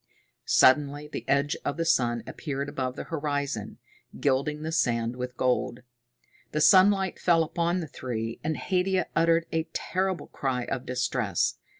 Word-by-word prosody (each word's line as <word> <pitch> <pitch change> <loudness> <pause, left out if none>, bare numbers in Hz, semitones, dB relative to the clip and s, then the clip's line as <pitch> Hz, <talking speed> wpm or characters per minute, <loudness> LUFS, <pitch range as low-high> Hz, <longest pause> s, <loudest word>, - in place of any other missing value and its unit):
Suddenly 145 +2 +4
the - - -7
edge 140 +1 +2
of 145 - -2
the 165 - -1
sun 120 -7 +2
appeared 140 -2 -4
above 130 -3 -3
the - - -5
horizon, 145 -8 -3 0.4
gilding 145 +2 0
the 160 - -3
sand 120 -7 0
with 125 0 -6
gold. 125 -1 0 0.7
The 150 - 0
sunlight 190 +4 +5
fell 170 -2 +4
upon 170 +2 -1
the 160 - -5
three, 115 -5 -5
and 155 0 -1
Haidia 185 -1 0
uttered 165 0 +3
a 160 0 -1
terrible 190 -1 -1
cry 130 -3 -2
of 130 +1 -4
distress. 125 -6 0
145 Hz, 150 wpm, -27 LUFS, 125-165 Hz, 0.7 s, sunlight